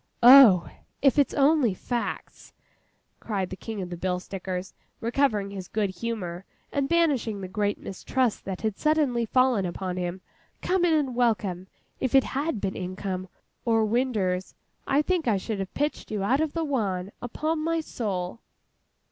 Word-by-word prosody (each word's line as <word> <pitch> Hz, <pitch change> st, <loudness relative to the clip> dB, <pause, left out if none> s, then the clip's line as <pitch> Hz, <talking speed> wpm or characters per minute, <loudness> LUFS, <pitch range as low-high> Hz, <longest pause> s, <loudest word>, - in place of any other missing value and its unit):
'Oh, 240 Hz, -9 st, +9 dB, 0.4 s
if 275 Hz, +1 st, +5 dB
it's 285 Hz, -, +2 dB
only 280 Hz, -7 st, +3 dB
facts,' 240 Hz, +5 st, -5 dB, 0.7 s
cried 195 Hz, -5 st, -3 dB
the -, -, -4 dB
King 210 Hz, 0 st, -5 dB
of 180 Hz, -, -8 dB
the 175 Hz, -, -5 dB
Bill 180 Hz, +1 st, -1 dB
Stickers, 185 Hz, 0 st, -5 dB, 0.3 s
recovering 225 Hz, -4 st, +1 dB
his 190 Hz, -3 st, -7 dB
good 210 Hz, -3 st, -1 dB
humour, 185 Hz, -3 st, -4 dB, 0.3 s
and 280 Hz, -1 st, -1 dB
banishing 280 Hz, -11 st, +1 dB
the 190 Hz, -, -5 dB
great 205 Hz, +2 st, -1 dB
mistrust 240 Hz, +4 st, -2 dB
that 190 Hz, -2 st, -5 dB
had 215 Hz, -3 st, -2 dB
suddenly 290 Hz, -7 st, +2 dB
fallen 255 Hz, -4 st, +3 dB
upon 180 Hz, +1 st, -4 dB
him, 180 Hz, +1 st, -3 dB, 0.4 s
'come 365 Hz, -1 st, +1 dB
in 335 Hz, -, +3 dB
and 275 Hz, -5 st, 0 dB
welcome! 200 Hz, -7 st, 0 dB, 0.3 s
If 260 Hz, +1 st, 0 dB
it 270 Hz, -, +7 dB
had 280 Hz, -2 st, -2 dB
been 195 Hz, -1 st, -2 dB
income, 185 Hz, 0 st, -4 dB, 0.4 s
or 225 Hz, -2 st, +2 dB
winders, 210 Hz, -6 st, 0 dB, 0.3 s
I 280 Hz, +2 st, +3 dB
think 350 Hz, -4 st, 0 dB
I 215 Hz, -4 st, +3 dB
should 205 Hz, +2 st, -4 dB
have 190 Hz, -1 st, -4 dB
pitched 295 Hz, +1 st, -2 dB
you 210 Hz, -2 st, -2 dB
out 255 Hz, +8 st, +2 dB
of 315 Hz, -2 st, -1 dB
the 330 Hz, -, -1 dB
wan, 200 Hz, -9 st, -1 dB
upon 310 Hz, +7 st, -2 dB
my 330 Hz, +1 st, +1 dB
soul! 205 Hz, -, -4 dB
220 Hz, 165 wpm, -26 LUFS, 190-270 Hz, 0.7 s, Oh